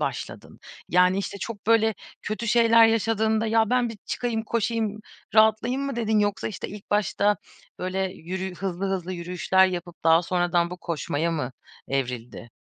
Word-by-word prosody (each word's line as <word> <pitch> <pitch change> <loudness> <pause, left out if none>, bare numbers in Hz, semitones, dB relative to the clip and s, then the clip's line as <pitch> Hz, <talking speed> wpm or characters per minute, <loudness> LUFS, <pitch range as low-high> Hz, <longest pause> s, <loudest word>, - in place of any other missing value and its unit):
başladın? - - -5 0.3
Yani, 180 +2 +4
işte, 200 0 -4
çok 205 +1 -7
böyle 220 -1 +4 0.3
kötü 215 +2 -4
şeyler 230 0 +6
yaşadığında, 220 0 +1
"Ya, 225 0 +2
ben 250 -1 +2
bir 225 - -7
çıkayım, 230 -2 -2
koşayım, 220 -1 -1 0.3
rahatlayayım." 220 +5 +4
mı 275 -3 -3
dedin? 220 -2 +1
Yoksa, 205 0 0
işte, 210 - -6
ilk 205 0 -11
başta 205 0 +2 0.4
böyle, 185 +1 -3 0.2
yürü 185 +2 -5
hızlı 190 0 -3
hızlı 185 -1 -2
yürüyüşler 180 +2 +2
yapıp 175 -2 -6
daha 165 +1 +5
sonradan 175 -1 +1
bu 180 - -6
koşmaya 165 -1 -2
mı 140 -6 -3 0.4
evrildi? 125 -3 -4
200 Hz, 150 wpm, -25 LUFS, 175-225 Hz, 0.4 s, şeyler